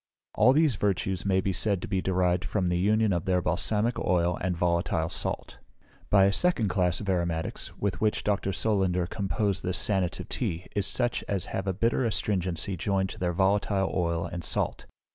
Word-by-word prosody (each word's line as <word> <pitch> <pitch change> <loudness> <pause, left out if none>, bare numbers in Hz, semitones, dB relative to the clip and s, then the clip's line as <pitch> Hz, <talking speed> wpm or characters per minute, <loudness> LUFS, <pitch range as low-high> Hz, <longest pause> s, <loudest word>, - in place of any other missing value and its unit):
All 115 +4 +5
these 145 -5 +3
virtues 95 -1 -1
may 95 -1 +3
be 95 0 -1
said 100 +1 0
to - - -4
be 95 -2 0
derived 90 -1 +1
from 90 -1 -1
the 90 0 0
union 105 +2 +2
of 85 -2 -2
their 90 -1 +2
balsamic 105 +7 0
oil 90 -1 +1
and 90 -1 -1
volatile 85 -2 0
salt. - - -3 0.5
By 100 -1 +6
a 100 - +2
second 115 - +2
class 90 -2 0
of 100 - -7
aromatics, 85 -3 -2
with 100 -1 -2
which 110 -1 +1
Dr. 100 -1 0
Solander 95 -2 +1
composed 100 +1 -1
this 90 0 -1
sanative 95 -4 0
tea, 85 +2 -3
is 100 -2 0
such 120 -1 -1
as 100 -2 -1
have 95 0 -3
a 95 - +1
bitter 115 +6 +1
astringency 95 -3 -1
joined 95 +2 0
to - - -9
their 90 -1 0
volatile 95 +1 +1
oil 85 -2 0
and 85 -1 -5
salt. - - -2
95 Hz, 185 wpm, -27 LUFS, 90-105 Hz, 0.5 s, By